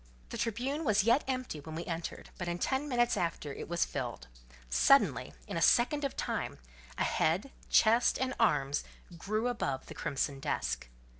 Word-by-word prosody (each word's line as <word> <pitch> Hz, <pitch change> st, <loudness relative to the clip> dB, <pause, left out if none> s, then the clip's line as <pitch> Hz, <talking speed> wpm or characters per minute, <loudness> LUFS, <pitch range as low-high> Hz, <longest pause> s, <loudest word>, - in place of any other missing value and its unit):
The -, -, -5 dB
Tribune 250 Hz, +7 st, -1 dB
was 215 Hz, -7 st, +3 dB
yet 235 Hz, +6 st, +4 dB
empty 255 Hz, -, -2 dB
when 155 Hz, +2 st, -8 dB
we 170 Hz, -, -4 dB
entered, 165 Hz, -1 st, -5 dB
but 175 Hz, -, -3 dB
in 175 Hz, 0 st, -1 dB
ten 270 Hz, +9 st, -1 dB
minutes 240 Hz, -2 st, +2 dB
after 165 Hz, -6 st, -2 dB
it -, -, -7 dB
was 170 Hz, 0 st, +1 dB
filled; 60 Hz, -, -5 dB, 0.4 s
suddenly, 275 Hz, -, +4 dB
in -, -, -4 dB
a -, -, -1 dB
second 290 Hz, +4 st, +4 dB
of 275 Hz, -, -2 dB
time, -, -, -2 dB, 0.4 s
a -, -, +1 dB
head, 185 Hz, +12 st, +1 dB, 0.2 s
chest, 230 Hz, +2 st, +5 dB
and 260 Hz, 0 st, -1 dB
arms 145 Hz, -11 st, +2 dB, 0.3 s
grew 215 Hz, +7 st, -1 dB
above 140 Hz, -, -2 dB
the -, -, -9 dB
crimson 140 Hz, 0 st, -2 dB
desk. -, -, -2 dB
215 Hz, 170 wpm, -32 LUFS, 155-255 Hz, 0.4 s, chest